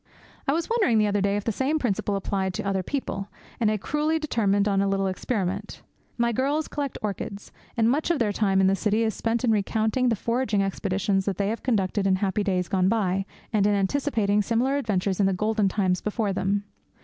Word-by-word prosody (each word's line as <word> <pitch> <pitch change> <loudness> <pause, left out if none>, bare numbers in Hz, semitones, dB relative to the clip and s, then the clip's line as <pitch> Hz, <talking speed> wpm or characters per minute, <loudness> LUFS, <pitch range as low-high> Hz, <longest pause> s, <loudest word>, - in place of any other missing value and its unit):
I 275 - +3
was 330 +1 -1
wondering 430 - +2
the 215 - +4
other 205 -1 +1
day 200 +1 +1
if 205 - -3
the 225 - 0
same 270 +8 0
principle 210 -6 -1
applied 190 -1 -2
to - - -3
other 195 -1 0
people, 200 -3 -3 0.3
and 220 - +3
I 215 - +1
cruelly 300 +8 0
determined 210 -10 +1
on 195 -1 +2
a 200 - +1
little 195 0 0
experiment. 190 0 -3 0.3
My 235 0 +2
girls 280 +6 0
collect 285 -2 -4
orchids, 200 0 -5 0.3
and 225 -1 +3
much 285 +8 +1
of 340 - +2
their 225 -5 +1
time 195 -2 +1
in - - +4
the 190 +1 +4
city 215 +2 +1
is 220 -1 0
spent 230 +3 -1
in 240 - +3
recounting 220 +4 +1
the 230 - +2
foraging 230 -1 0
expeditions 195 0 -1
that 195 -3 -1
they 200 0 0
have 225 - -3
conducted 205 -4 0
in 190 - +4
happy 195 +2 0
days 185 -3 0
gone 185 0 +2
by, 195 -3 0 0.3
and 205 -2 +3
in 205 - +3
anticipating 210 -1 +1
similar 240 +6 +1
adventures 200 -7 -1
in 195 - +4
the 195 - +1
golden 215 +2 +1
times 185 -2 0
before 210 -1 -1
them. 195 +2 0
205 Hz, 215 wpm, -25 LUFS, 195-235 Hz, 0.3 s, the